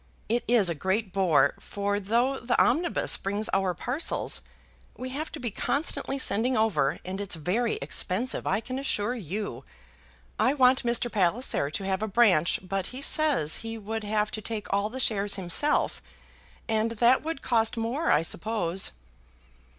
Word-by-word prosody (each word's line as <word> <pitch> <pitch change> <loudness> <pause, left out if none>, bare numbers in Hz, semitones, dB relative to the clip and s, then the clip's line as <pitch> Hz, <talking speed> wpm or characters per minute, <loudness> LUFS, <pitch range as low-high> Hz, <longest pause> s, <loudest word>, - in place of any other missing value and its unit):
It 240 +2 0
is 230 -5 +4
a 170 - +2
great 190 +5 -2
bore, 185 -6 +3
for 205 0 -2
though 235 +7 0
the 245 0 0
omnibus 330 +8 +2
brings 205 +2 -2
our 190 -2 +1
parcels, 260 - -1 0.6
we 255 +1 -5
have 295 +5 -5
to 315 - -6
be 240 -3 -3
constantly 280 - -1
sending 250 -1 +2
over, 170 -11 +1
and 190 +2 -4
it's 200 -3 +1
very 195 +9 -1
expensive, 230 +8 -1
I 195 +3 +1
can 255 +3 -5
assure 240 -4 -1
you. 205 -2 -5 0.8
I 265 - +3
want 260 -1 +4
Mr. 240 0 0
Palliser 195 - +1
to 155 +6 -4
have 190 0 -1
a 220 - -1
branch, 195 -7 +3
but 195 0 -2
he 255 +2 -7
says 285 - +3
he 225 0 -6
would 220 +1 -5
have 210 0 -1
to 215 - -4
take 215 0 -4
all 200 +1 +1
the 260 +3 -6
shares 205 -5 +2
himself, 190 - +1 0.7
and 225 0 0
that 235 +3 +4
would 320 -1 -5
cost 225 -1 +1
more, 240 +9 -1
I 160 - +4
suppose." 190 - -2
220 Hz, 165 wpm, -27 LUFS, 195-245 Hz, 0.8 s, is